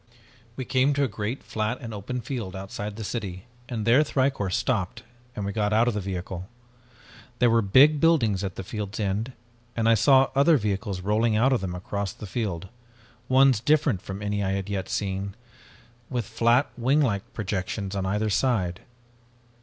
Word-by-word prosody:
"We 130 - -4
came 130 +3 +2
to 145 - +2
a - - +2
great 110 +4 -4
flat 110 +3 -2
and 115 -2 -7
open 115 +5 -4
field 115 -6 -5
outside 100 +2 -6
the 110 - -6
city 95 -4 -5 0.2
and 110 -4 -3
there 120 +5 +6
Thicourt 130 -9 0
stopped 100 -2 -1 0.3
and 105 - -3
we 100 - -2
got 105 0 0
out 115 +2 +4
of 120 - +2
the 105 - -2
vehicle. 95 -1 -5 0.9
There 120 -1 +4
were 115 0 +4
big 135 +9 +5
buildings 120 - +3
at 95 -2 -4
the - - -5
field's 105 +1 -5
end, 105 +5 -1 0.4
and 115 -1 +1
I 115 - +6
saw 130 +4 +5
other 145 +3 +5
vehicles 100 -4 -2
rolling 110 +3 +1
out 130 +4 +4
of 125 - +1
them 90 -2 -3
across 100 +2 -4
the - - -9
field, 95 -4 -3 0.6
ones 130 -2 +5
different 145 - +2
from 95 +2 -7
any 105 0 -1
I 95 0 0
had 100 0 -3
yet 95 -2 -3
seen, 100 0 -2 0.7
with 120 -4 -2
flat 120 +5 +2
winglike 125 -5 +1
projections 100 -1 -3
on 95 -1 -1
either 105 +2 0
side. 95 -7 +1
105 Hz, 175 wpm, -26 LUFS, 95-125 Hz, 0.9 s, there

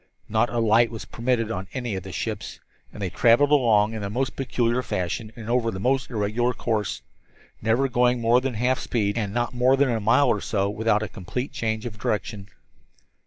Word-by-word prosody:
Not 110 +2 +1
a 120 - -3
light 115 +1 +4
was 115 -2 -7
permitted 115 -2 -1
on 95 -2 -4
any 125 -4 -3
of 95 - -3
the - - -9
ships, - - -4 0.3
and - - -11
they 95 -4 -3
traveled 120 +8 +4
along 110 -6 +4
in 110 - -5
the 100 - -3
most 130 +5 -2
peculiar 125 -2 0
fashion 105 +1 -3
and 115 -3 -9
over 120 -1 +1
the 95 -4 -5
most 130 +5 0
irregular 115 +2 0
course, 105 - -2 0.6
never 115 +5 +2
going 125 -1 +2
at - - -6
more 120 +2 +4
than 130 -2 -3
half 125 +3 +1
speed 105 -4 -1
and 105 -4 -2
not 120 +3 -1
more 125 +2 +3
than 140 -1 +3
a 115 - 0
mile 115 +7 +3
or 105 - +1
so 100 -1 -1
without 110 0 +1
a - - -3
complete 125 +9 -5
change 110 -1 -2
of 105 -3 -7
direction. 105 -2 -3
115 Hz, 210 wpm, -24 LUFS, 105-125 Hz, 0.6 s, light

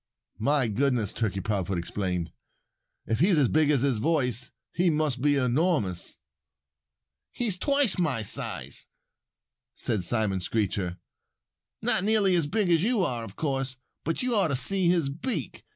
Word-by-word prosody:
"My 140 +2 +2
goodness!" 120 -1 0
Turkey 100 -4 -1
Proudfoot 95 -3 -1
exclaimed. 90 0 -3 0.7
"If 110 - -1
he's 175 +2 +4
as 140 -4 +4
big 155 -1 +3
as 145 -5 +3
his 135 -5 +1
voice 130 -4 0 0.2
he 175 0 +2
must 150 -5 0
be 145 +1 +3
enormous." 130 - 0 1.1
"He's 230 -6 -2
twice 275 0 +1
my 140 -10 0
size," 105 - -4 0.9
said 105 -5 -1
Simon 105 -1 +1
Screecher. 95 -2 -1 0.9
"Not 180 - +2
nearly 205 -2 +3
as 170 -4 +2
big 200 +1 +1
as 165 -2 +4
you 225 +1 +2
are, 125 -9 -1
of 100 -3 -10
course! 135 -3 -2 0.3
But 165 - -2
you 250 -1 0
ought 195 -5 +3
to 140 - -1
see 175 +8 +2
his 170 -6 +2
beak. 170 - -4
140 Hz, 150 wpm, -27 LUFS, 110-175 Hz, 1.1 s, he's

